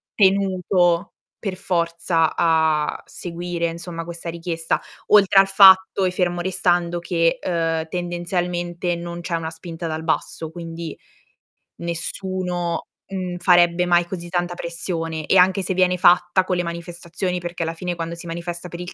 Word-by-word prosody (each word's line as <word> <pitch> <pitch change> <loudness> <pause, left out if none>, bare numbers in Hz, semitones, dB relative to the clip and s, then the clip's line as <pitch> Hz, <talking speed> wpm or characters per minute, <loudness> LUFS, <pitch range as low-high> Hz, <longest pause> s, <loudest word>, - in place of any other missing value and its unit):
tenuto 190 -2 +2 0.3
per 195 -3 -3
forza 170 -2 0
a 160 -2 +2
seguire, 175 -1 -4
insomma, 165 0 -6
questa 170 0 -6
richiesta. 165 -1 -2 0.3
Oltre 200 -2 +6
al 195 - 0
fatto 190 0 +6
e 185 - +1
fermo 175 -1 0
restando 175 -1 +1
che, 165 -1 +1
ehm, 165 -2 -1
tendenzialmente 175 0 -2
non 170 0 -6
c'è 170 0 -2
una 165 -1 -3
spinta 165 0 -8
dal 160 0 -4
basso, 160 0 -2
quindi 165 -1 -7 0.8
nessuno, 175 +1 -3 0.2
mhmm, 185 -2 -4
farebbe 175 -1 +4
mai 175 -1 +3
così 175 -1 -6
tanta 175 0 -1
pressione 165 -2 -3
e 190 - +4
anche 185 +2 +5
se 185 - -1
viene 180 0 +2
fatta 180 +1 +4
con 185 -1 -1
le 175 - 0
manifestazioni, 170 +1 -4
perché 175 -1 -4
alla 165 0 -2
fine 175 +1 -3
quando 170 0 -4
si 170 - -9
manifesta 170 +1 -5
per 170 +1 -7
il 180 +1 -7
175 Hz, 150 wpm, -22 LUFS, 170-180 Hz, 0.8 s, Oltre